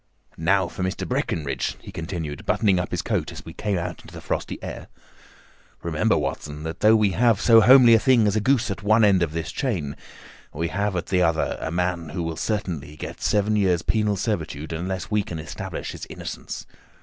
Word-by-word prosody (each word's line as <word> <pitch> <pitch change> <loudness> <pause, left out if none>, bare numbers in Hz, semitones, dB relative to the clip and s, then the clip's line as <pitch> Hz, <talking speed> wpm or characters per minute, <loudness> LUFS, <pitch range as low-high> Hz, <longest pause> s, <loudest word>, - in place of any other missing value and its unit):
"Now 95 +3 +2
for 85 - -8
Mr. 95 +1 -2
Breckinridge," 70 -5 -2
he - - -11
continued, 80 -3 -5
buttoning 100 -5 +3
up 90 - -2
his - - -2
coat - - -1
as - - -10
we 80 - -9
came 100 +2 -1
out 85 - -4
into - - -14
the - - -9
frosty - - -3
air. - - -7 1.0
"Remember, - - +1
Watson 75 +1 -4
that 80 +2 -5
though 110 +1 +6
we 105 -3 +3
have 115 0 +3
so 115 -1 +7
homely 125 +1 +8
a 115 - +6
thing 125 -2 +4
as 105 0 +2
a - - +3
goose 125 -1 +2
at 100 - -5
one 110 +2 +4
end 100 -3 +5
of 85 -3 +1
this 80 0 -4
chain, 90 - -2 0.6
we 85 0 -2
have 100 +1 -1
at 85 - -2
the 90 -1 +1
other 80 -2 +1
a - - -2
man 85 -1 -1
who 85 +3 -3
will 80 -1 -3
certainly 85 -7 -3
get - - -8
seven 105 +1 +2
years' 95 -5 +2
penal 105 -2 +1
servitude 80 -7 -3
unless 90 +5 -4
we 105 0 +3
can 95 -5 -6
establish 80 0 -6
his - - -8
innocence. - - -7
95 Hz, 205 wpm, -24 LUFS, 80-105 Hz, 1.0 s, homely